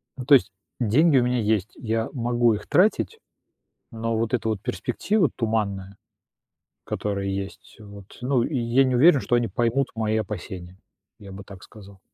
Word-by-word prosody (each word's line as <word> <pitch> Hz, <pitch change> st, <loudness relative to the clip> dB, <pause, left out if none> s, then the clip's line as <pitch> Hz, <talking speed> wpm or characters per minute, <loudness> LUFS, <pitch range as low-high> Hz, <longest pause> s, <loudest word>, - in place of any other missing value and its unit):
ну, 130 Hz, -, -7 dB
то 140 Hz, +1 st, +7 dB
есть 120 Hz, -, +2 dB, 0.3 s
деньги 135 Hz, +6 st, +3 dB
у 125 Hz, -, +4 dB
меня 125 Hz, 0 st, 0 dB
есть, 110 Hz, -2 st, 0 dB
я 115 Hz, -1 st, -2 dB
могу 120 Hz, -2 st, +1 dB
их 105 Hz, 0 st, -6 dB
тратить, 215 Hz, -, +2 dB, 0.7 s
но 115 Hz, 0 st, -3 dB
вот 115 Hz, +2 st, -1 dB
эта 110 Hz, -2 st, 0 dB
вот 110 Hz, -3 st, -2 dB
перспектива 200 Hz, -7 st, 0 dB
туманная, 100 Hz, -4 st, -2 dB, 0.9 s
которая 100 Hz, -1 st, -3 dB
есть, 95 Hz, 0 st, -6 dB
вот 100 Hz, -2 st, -13 dB
ну, 125 Hz, -1 st, +1 dB
я 125 Hz, -2 st, +1 dB
не 130 Hz, -1 st, +1 dB
уверен, 145 Hz, +3 st, +6 dB
что 120 Hz, -, 0 dB
они 120 Hz, -1 st, +1 dB
поймут 120 Hz, +3 st, 0 dB
мои 110 Hz, -1 st, 0 dB
опасения, 95 Hz, -3 st, -6 dB, 0.4 s
я 100 Hz, -2 st, -11 dB
бы 100 Hz, +1 st, -9 dB
так 95 Hz, -2 st, -13 dB
сказал. 100 Hz, -3 st, -15 dB
115 Hz, 165 wpm, -24 LUFS, 100-125 Hz, 0.9 s, то